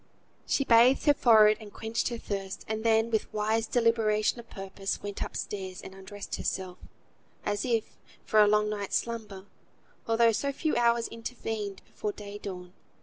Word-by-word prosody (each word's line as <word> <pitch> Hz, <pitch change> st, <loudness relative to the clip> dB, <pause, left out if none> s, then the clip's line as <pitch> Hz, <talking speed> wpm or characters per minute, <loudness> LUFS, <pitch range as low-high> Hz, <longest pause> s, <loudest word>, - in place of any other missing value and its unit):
She 275 Hz, -, +2 dB
bathed 245 Hz, +1 st, +5 dB
her 290 Hz, -, +6 dB
forehead, 215 Hz, -5 st, +6 dB
and 210 Hz, -1 st, -10 dB
quenched 225 Hz, +2 st, -2 dB
her 235 Hz, -, -4 dB
thirst, 195 Hz, -3 st, -5 dB
and 220 Hz, 0 st, -3 dB
then, 225 Hz, 0 st, +3 dB
with 220 Hz, -, 0 dB
wise 220 Hz, +2 st, 0 dB
deliberation 230 Hz, -2 st, +2 dB
of 235 Hz, -, -12 dB
purpose, 195 Hz, 0 st, -5 dB
went 205 Hz, -1 st, -5 dB
upstairs, 190 Hz, -2 st, -4 dB
and 190 Hz, -, -10 dB
undressed 195 Hz, +1 st, -7 dB
herself, 185 Hz, -1 st, -3 dB, 0.7 s
as 205 Hz, +2 st, -1 dB
if 230 Hz, -3 st, -1 dB, 0.3 s
for 215 Hz, -, +3 dB
a 210 Hz, -, +6 dB
long 210 Hz, 0 st, +3 dB
night's 205 Hz, -2 st, -3 dB
slumber, 215 Hz, -5 st, -3 dB, 0.6 s
although 230 Hz, 0 st, +4 dB
so 280 Hz, +6 st, -1 dB
few 305 Hz, +3 st, -1 dB
hours 235 Hz, -1 st, +3 dB
intervened 225 Hz, -4 st, -5 dB
before 210 Hz, -, -4 dB
day 205 Hz, 0 st, -8 dB
dawn. 180 Hz, -3 st, -7 dB
215 Hz, 160 wpm, -29 LUFS, 200-230 Hz, 0.7 s, her